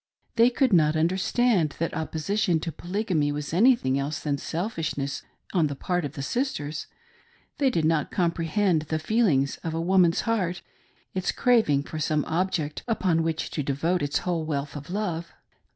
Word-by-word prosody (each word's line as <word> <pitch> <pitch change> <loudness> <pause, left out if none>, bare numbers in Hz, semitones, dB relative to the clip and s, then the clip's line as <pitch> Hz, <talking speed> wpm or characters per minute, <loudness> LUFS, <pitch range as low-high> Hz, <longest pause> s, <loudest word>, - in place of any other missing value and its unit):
They 235 +1 +6
could 250 -2 +1
not 155 -3 +4
understand 180 - +2
that 165 - -2
opposition 165 +3 0
to 165 - -3
Polygamy 175 -3 -1
was 145 +1 -4
anything 185 - +4
else 150 +3 -2
than 145 -2 -2
selfish 165 -1 -3
ness 140 0 -3 0.3
on 170 -5 +3
the 140 - -4
part 180 +3 -1
of 140 - -5
the 140 - -5
sisters; 155 - -2 0.7
they 275 -2 +4
did 165 -11 0
not 160 -2 +1
comprehend 170 0 +1
the 160 - +1
feeUngs 155 - +1
of 160 -1 -3
a - - -1
woman's 175 0 +3
heart 190 -6 -1 0.3
— - - -38
its 185 0 0
craving 220 - +3
for 155 - -6
some 150 -1 0
object 160 -3 -1
upon 185 -8 +1
which 160 -1 -2
to 150 - -2
devote 150 +6 0
its 145 0 0
whole 175 -3 0
wealth 145 -2 -3
of 145 +3 -8
love. 175 -4 -3
165 Hz, 170 wpm, -26 LUFS, 150-190 Hz, 0.7 s, They